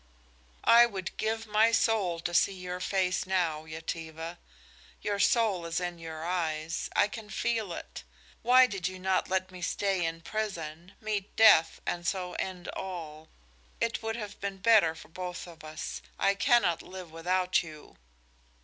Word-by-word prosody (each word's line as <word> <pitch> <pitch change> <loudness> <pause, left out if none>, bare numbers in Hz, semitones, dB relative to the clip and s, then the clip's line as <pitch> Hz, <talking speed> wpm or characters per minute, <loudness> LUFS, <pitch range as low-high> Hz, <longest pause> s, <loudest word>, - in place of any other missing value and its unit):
"I 235 +1 +8
would 190 -5 -5
give 225 +1 -1
my 215 +1 +4
soul 210 -7 +2
to 175 - -3
see 195 +2 +3
your 180 0 -5
face 185 -1 0
now, 170 -5 0
Yetive. 160 +1 -6 0.7
Your 205 -1 -1
soul 210 -5 +3
is 165 0 -1
in 175 -1 -4
your 160 -1 -6
eyes; 165 -2 -2
I - - +5
can 215 0 -9
feel 225 -5 -1
it. - - -8 0.4
Why 255 +2 +7
did 195 -7 -2
you 185 0 -6
not 190 0 0
let 185 0 0
me 180 -1 -10
stay 195 0 0
in 165 0 -2
prison, 175 -3 -4
meet 210 -2 -3
death 165 -7 +6
and 175 -1 -2
so 180 -1 -2
end 185 -2 -4
all? 160 -4 -6 0.5
It 230 0 0
would 225 0 -2
have 210 -3 -7
been 200 -1 -3
better 200 -5 +5
for - - -12
both 180 +1 -6
of 170 -3 -13
us. 155 0 -6 0.2
I 200 - +3
cannot 215 - +3
live 185 -3 -9
without 180 +3 +1
you." 155 -3 -12
185 Hz, 160 wpm, -30 LUFS, 165-210 Hz, 0.7 s, I